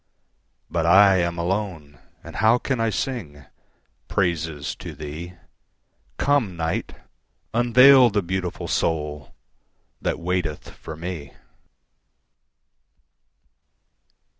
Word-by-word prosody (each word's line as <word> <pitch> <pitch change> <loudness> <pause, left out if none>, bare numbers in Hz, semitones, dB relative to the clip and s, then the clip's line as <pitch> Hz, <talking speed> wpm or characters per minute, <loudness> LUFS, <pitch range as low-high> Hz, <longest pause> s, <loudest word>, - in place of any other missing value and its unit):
But 85 0 -1
I 95 +2 +7
am 85 -1 -1
alone, 85 -5 -3 0.2
and - - -9
how 115 +2 +4
can 130 0 -2
I 115 0 +1
singPraises 80 - -4
to - - -8
thee? 80 +4 -8 0.8
Come, 130 -11 +1
Night! 80 0 -3 0.6
unveil 125 +2 +7
the 105 -2 0
beautiful 90 0 -3
soulThat 75 -3 -4
waiteth 90 -3 -3
for 80 - -9
me. 85 -4 -7
90 Hz, 85 wpm, -23 LUFS, 80-105 Hz, 0.8 s, I